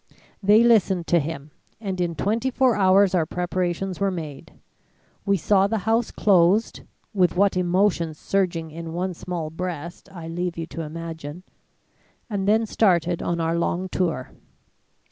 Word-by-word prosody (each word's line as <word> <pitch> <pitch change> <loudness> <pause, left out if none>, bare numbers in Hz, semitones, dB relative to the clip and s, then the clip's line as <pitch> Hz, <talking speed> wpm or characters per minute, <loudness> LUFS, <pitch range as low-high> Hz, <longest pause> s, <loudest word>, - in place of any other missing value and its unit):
They 210 +3 +5
listened 195 -7 +3
to 175 - +4
him 150 -1 -5 0.3
and 190 -4 -3
in 170 -1 -1
twenty 220 - 0
four 255 -2 +2
hours 195 0 +4
our 165 -4 +2
preparations 180 +1 -2
were 200 0 +1
made. 155 -7 -7 0.7
We 200 0 +3
saw 195 +3 +3
the 225 - -1
house 225 +1 +2
closed 195 +2 +2 0.3
with 180 -4 +2
what 200 +1 +3
emotions 180 -3 +1
surging 170 -5 -1
in 165 +1 -7
one 180 +2 -2
small 170 -2 -5
breast, 170 -1 -6
I 170 -3 -8
leave 175 +1 -3
you 165 - -3
to 165 - -7
imagine 160 0 -7 0.9
and 200 -1 -2
then 220 +2 +3
started 175 -6 +1
on 170 0 -2
our 165 0 0
long 175 +2 -1
tour. 165 -9 -2
180 Hz, 150 wpm, -23 LUFS, 165-195 Hz, 0.9 s, They